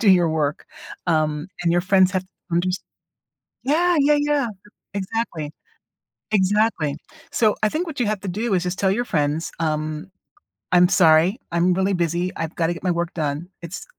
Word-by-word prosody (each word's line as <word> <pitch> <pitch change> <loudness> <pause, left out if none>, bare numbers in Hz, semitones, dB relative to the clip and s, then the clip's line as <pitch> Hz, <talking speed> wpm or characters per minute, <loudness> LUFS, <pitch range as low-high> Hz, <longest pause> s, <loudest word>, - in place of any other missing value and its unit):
do 210 - +5
your 175 -3 +5
work, 155 -1 -1 0.4
um, 155 0 0
and 170 - +2
your 175 - +3
friends 185 0 +4
have 185 -1 0
to 185 - -26 0.2
unders 180 +2 +1 0.9
yeah, 340 +6 +3
yeah, 295 +1 +4
yeah, 290 -3 +1 0.5
exactly, 190 -6 -3 0.8
exactly. 200 -6 +2 0.4
So, 215 -3 +3
I 215 - +4
think 320 +10 -2
what 305 -5 -6
you 240 - +2
have 210 -1 -1
to 195 - -6
do 210 +4 -1
is 180 - +1
just 180 +2 -3
tell 190 -1 +2
your 240 +5 0
friends, 155 -5 -1
um, 155 +1 -2 0.6
"I'm 180 0 +6
sorry, 175 +1 +5
I'm 175 +2 +3
really 190 +2 +1
busy, 175 +1 0
I've 165 0 -4
gotta 165 0 +1
get 170 - -10
my 180 - +2
work 170 0 -2
done, 155 +2 -3
it's 170 +2 -7
180 Hz, 175 wpm, -22 LUFS, 165-205 Hz, 0.9 s, I'm